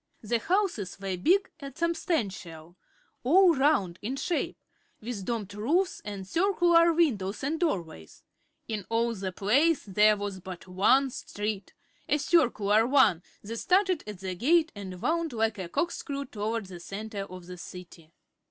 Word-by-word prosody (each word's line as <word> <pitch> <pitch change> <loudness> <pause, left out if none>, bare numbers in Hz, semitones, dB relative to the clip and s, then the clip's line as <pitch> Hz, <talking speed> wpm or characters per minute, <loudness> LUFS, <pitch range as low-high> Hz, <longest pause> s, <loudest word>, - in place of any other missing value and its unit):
The 230 +2 0
houses 340 - -1
were 195 -1 -3
big 365 - +2
and 275 -3 -9
substantial, 200 - -2 0.5
all 350 +7 +6
round 265 - +2
in 245 +6 -3
shape, 325 +5 -2 0.4
with 215 -4 -6
domed 210 -4 -3
roofs 330 - 0
and 200 -2 -6
circular 340 - +4
windows 235 - 0
and 310 +4 -1
doorways. 170 - -3 0.4
In 210 -4 -4
all 230 +1 +1
the 190 -3 -4
place 270 - +2
there 210 +1 +4
was 200 -2 -4
but 185 -1 -9
one 255 +9 +3
street 205 -4 -5 0.4
a 295 - +3
circular 235 - +3
one 260 - +4 0.2
that 225 +3 -6
started 370 - +2
at 205 -3 -8
the 190 -1 -3
gate 315 - +3
and 190 -3 -8
wound 330 -2 0
like 220 -2 0
a 180 -2 -5
corkscrew 280 - -2
toward 220 -2 -3
the 185 -2 -10
center 205 +4 -6
of 185 -2 -10
the 180 0 -9
City. 175 -3 -11
220 Hz, 150 wpm, -28 LUFS, 190-315 Hz, 0.5 s, all